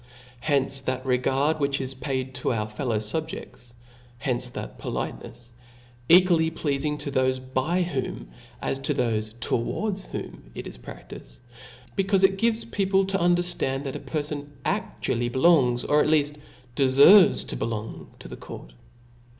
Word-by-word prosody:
Hence 135 0 0
that 130 0 -3
regard, 135 +4 +1
which 140 -1 0
is 130 0 -4
paid, 130 -1 -3
to 125 +1 -1
our 110 -3 -1
fallow 115 +1 -2
fu5je(flai 120 +1 -5 0.5
hence 125 +1 -1
that - - -8
politenefs, - - -5 0.7
equally 170 -2 +6
pfeaC 145 -4 -2
ing 150 0 -1
to 150 -1 -5
thofe 130 -1 -1
by 170 +8 +1
whom, 130 - -4 0.3
as 135 - -1
to 135 - -1
thofe 110 -1 -1
towards 190 - -2
whoni, - - -7 0.2
jt - - -6
is - - -9
praftifed; - - -11 0.6
becaufe 195 0 +2
it 190 0 +4
gives 230 0 +1
people 195 -3 +1
to 195 -1 -1
under 175 0 +3
fl:and, 135 -5 -1
th^f 135 - -3
a - - -4
pcrfon. 150 -2 -4 0.2
actually 120 +1 -1
belongs, 130 -3 +3
or 150 0 +4
^t - - 0
leaft 150 -1 +2 0.4
defervcs 140 +9 +6
to - - -1
belor>g> 110 -1 -4
to - - -11
the - - -9
court. - - -10
135 Hz, 150 wpm, -25 LUFS, 125-165 Hz, 0.7 s, equally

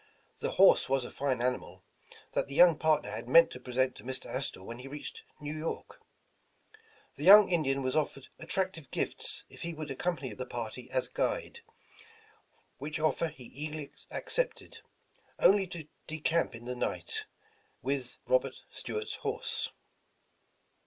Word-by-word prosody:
The - - -2
horse - - +6
was 135 -2 +2
a - - -7
fine 130 -3 0
ani 125 0 +2
mal - - -14 0.5
that - - 0
the 140 - -6
young 175 0 +8
partner 155 -8 +2
had 115 +3 -6
meant 165 +5 +8
to 125 - -7
present 130 +1 0
to - - -11
Mr. 130 +1 -5
Astor 130 -7 -4
when 115 +4 -7
he 130 - -8
reached 145 +2 -7 0.2
New 150 +1 -4
York. 155 +1 -5 1.2
The 145 - -6
young 200 +2 +10
In 170 -2 +3
dian 135 -1 0
was 130 0 0
offered 140 -3 -1
attractive 185 -6 -2
gifts - - -1
if - - -13
he 170 -1 -4
would 155 -1 -6
accom 175 +6 -1
pany 130 -6 -5
the 130 +2 -5
party 120 +1 -5
as 130 -1 0
guide, - - -1 1.2
which 150 +3 -4
offer 155 +1 +2
he 150 -5 -11
eagerly 150 +2 -6 0.2
ac - - -4
cepted, - - -2 0.6
only 195 -1 +5
to 170 -4 -7 0.2
decamp 155 -2 0
in 115 +1 -10
the 125 - -3
night, 125 - -3 0.6
with 135 +2 +2
his 130 - -7
o^m, 125 - -10
and - - -12
Robert - - +3 0.2
Stuart's 435 0 -4
horse. - - -1
145 Hz, 170 wpm, -31 LUFS, 130-165 Hz, 1.2 s, young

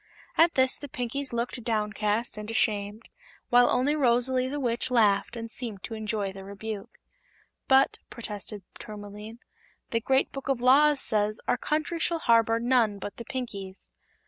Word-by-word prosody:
At 335 +1 +4
this 260 0 +3
the 290 - -7
Pinkies 255 +3 -3
looked 235 +1 -3
downcast 215 0 -1
and 210 0 -7
ashamed, 210 -1 0 0.4
while 245 0 +6
only 280 +4 +2
Rosalie 255 -1 +2
the 290 +3 -3
Witch 240 -3 -1
laughed 220 -2 +2
and 230 -1 -6
seemed 225 -7 -6
to 230 - -6
enjoy 215 -3 -2
the 195 0 -9
rebuke. 200 +1 -7 0.7
"But," 265 0 +4
protested 210 -2 -7 0.2
Tourmaline, 210 +1 -9 0.5
"the 230 - +1
Great 265 +3 +1
Book 275 0 -7
of 270 -3 +1
Laws 280 +4 +5
says 215 -3 +1
our - - +3
country 310 +6 -2
shall 335 +1 +1
harbor 230 -5 +3
none 235 -4 +2
but 200 +1 -7
the 235 - -8
Pinkies." 200 -8 -6
230 Hz, 155 wpm, -27 LUFS, 210-260 Hz, 0.7 s, while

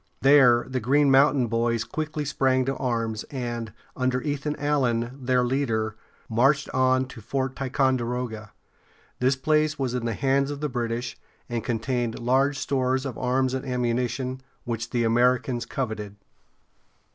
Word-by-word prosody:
There 130 -4 +6
the 130 0 -2
Green 140 +4 +3
Mountain 135 -1 +5
Boys 115 0 0
quickly 155 +1 -4
sprang 130 -2 +1
to 135 +1 -1
arms, 115 -4 -2
and, 120 -4 -4 0.2
under 130 -1 0
Ethan 145 +1 -2
Allen, 125 -4 0
their 125 0 +2
leader, 115 -4 0 0.3
marched 135 +5 +2
on 130 0 +2
to 125 -3 -10
Fort 130 +3 -2
Ticonderoga. 125 -5 -1 0.7
This 130 +2 +3
place 155 +2 +1
was 130 -3 -1
in 125 -2 -2
the 115 -2 -1
hands 135 +2 +1
of 145 -1 -5
the 150 0 -2
British, 120 -1 -3 0.3
and 120 -2 -3
contained 120 0 -1
large 135 +4 +2
stores 130 -1 0
of 130 -4 -4
arms 130 +1 0
and 130 - -2
ammunition, 125 0 -1 0.2
which 115 0 -4
the 120 -2 0
Americans 120 +1 +2
coveted. 110 -6 -4
125 Hz, 145 wpm, -25 LUFS, 120-135 Hz, 0.7 s, There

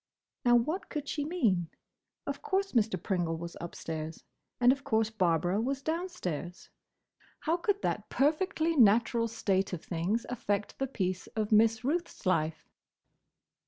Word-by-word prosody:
Now, 240 -2 +5
what 305 +11 0
could 300 -2 -4
she 290 - -2
mean? 225 - +1 0.6
Of - - -4
course 395 -2 0
Mr. 225 -2 +2
Pringle 175 -4 -1
was 170 +1 -7
upstairs, 160 -2 -5 0.4
and 245 0 +6
of 275 +1 -2
course 220 -2 +1
Barbara 180 -1 +1
was 270 +3 -2
downstairs. 315 - -4 0.7
How 325 +1 +1
could 400 +3 -1
that - - -1
perfectly 320 +3 +1
natural 230 -1 +4
state 195 -4 0
of 170 - -4
things 185 +7 -1
affect 205 -4 -2
the 270 - 0
peace 185 -7 -2
of 215 -1 -1
Miss 220 +1 +4
Ruth's 335 +2 -2
life? 160 -3 0
225 Hz, 140 wpm, -31 LUFS, 185-290 Hz, 0.7 s, and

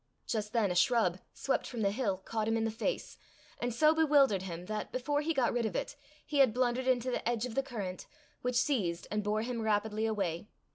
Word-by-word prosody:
Just 210 -2 -2
then 220 -5 +2
a - - -2
shrub, 185 -3 +3
swept 270 - -1
from 235 -3 -5
the 200 - +3
hill, 205 -4 -1
caught 220 -1 -2
him 225 0 +2
in 225 - 0
the 225 - 0
face, 225 - -3 0.4
and 245 - -1
so 305 +7 +4
bewildered 285 - +4
him, 175 -2 -6
that, 215 +1 -4
before 290 +3 0
he 315 +2 -1
got 265 -6 +2
rid 240 -2 +1
of - - -6
it, - - -3 0.3
he 290 -1 -1
had 260 -5 +5
blundered 255 0 +1
into 255 0 +2
the 240 - -1
edge 235 -1 0
of 250 - -6
the 270 - +2
current, 205 -9 -6 0.3
which 250 0 -1
seized 205 - +1
and 210 0 0
bore 210 +1 0
him 235 -1 -3
rapidly 220 0 0
away. 195 -5 -2
225 Hz, 225 wpm, -32 LUFS, 210-255 Hz, 0.4 s, had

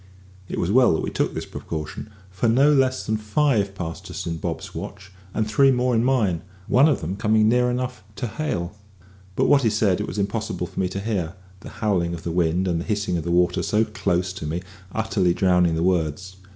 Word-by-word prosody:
It - - -4
was 90 - 0
well 125 -6 +5
that - - -1
we - - -3
took - - -1
this - - -4
precaution, 80 +6 -6 0.2
for 105 +5 0
no 140 +6 +5
less 130 -2 +2
than 110 0 0
five 105 -2 +1
passed 85 -4 -6
us - - -5
in 85 -1 -3
Bob's - - -5
watch, 95 -1 -8 0.2
and 110 - 0
three 135 +6 +4
more 125 0 +1
in 115 0 +2
mine, 110 -10 +1 0.2
one 135 +9 +5
of 145 - 0
them 85 +4 -3
coming 110 +1 +3
near 125 +2 +3
enough 125 -3 -3
to 125 - -3
hail; 105 - -3 0.6
but - - +2
what 140 - +5
he 115 - +3
said 105 -3 +1
it 105 - -3
was - - -6
impossible 105 -2 -2
for - - -7
me 95 -1 +1
to 95 - -4
hear, 95 -5 -2 0.2
the - - -10
howling 90 -5 0
of 80 - -10
the 85 - -3
wind 85 +2 +1
and 85 -2 0
the - - -6
hissing 105 -4 -1
of 85 - -2
the 85 - -4
water 90 0 +2
so 110 +1 +2
close 90 -4 -1
to 80 -5 -6
me 85 +4 -3 0.3
utterly 95 -5 +1
drowning 90 -3 +3
the 80 - 0
words. 90 +1 -1
100 Hz, 220 wpm, -23 LUFS, 90-115 Hz, 0.6 s, well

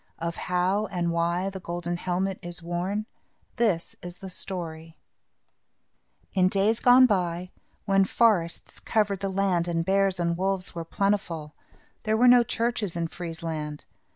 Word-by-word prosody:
Of 170 0 -3
how 185 +4 0
and 175 -3 -1
why 170 +3 0
the 190 - -7
golden 175 0 -4
helmet 185 +2 -2
is 175 -1 -5
worn, 180 +5 -2 0.5
this 205 -8 +1
is 175 0 -7
the 190 0 -9
story: 165 -4 -2 1.4
In 185 -2 +4
days 200 +4 +2
gone 255 +1 +7
by, 180 -4 -1 0.3
when 195 -1 +4
forests 190 -6 +1
covered 205 -3 0
the 195 0 -2
land 190 -3 +1
and 165 -1 -1
bears 195 -1 +2
and 170 0 +1
wolves 190 +1 -1
were 170 -1 -5
plentiful, 170 -5 -1 0.5
there 220 0 0
were 250 +2 +5
no 245 0 +8
churches 230 -5 -1
in 165 -1 -2
Friesland. 160 -3 -5
180 Hz, 145 wpm, -26 LUFS, 170-195 Hz, 1.4 s, no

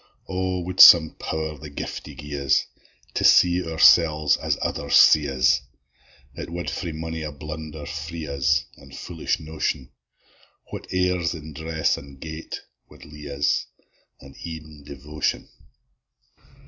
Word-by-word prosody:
O 95 -1 -2
wad 90 +1 -6
some 80 -2 +9
Power 80 -1 -4
the 75 - -9
giftie 70 - -7
gie 75 0 -6
us 70 0 +2 0.5
To - - -2
see 90 0 +5
oursels 80 -2 +4
as - - -1
ithers 70 0 -3
see 75 -2 +6
us! 65 0 +2 0.7
It - - -7
wad 85 +1 -4
frae 85 -3 -4
mony 80 +1 -5
a 75 -1 -5
blunder 75 +1 -8
free 80 +2 -6
us, 70 0 +1
An' 70 -1 -16
foolish 80 +4 -3
notion: 75 -4 -4 0.8
What - - -7
airs 90 -3 0
in 80 -1 -10
dress 80 +1 -1
an' 70 -1 -13
gait 80 +3 -8 0.3
wad - - -17
lea'e 75 -1 -10
us, 70 - +1 0.5
An' 70 0 -14
ev'n 80 -3 -9
devotion! 75 +2 -4
80 Hz, 135 wpm, -23 LUFS, 75-80 Hz, 0.8 s, some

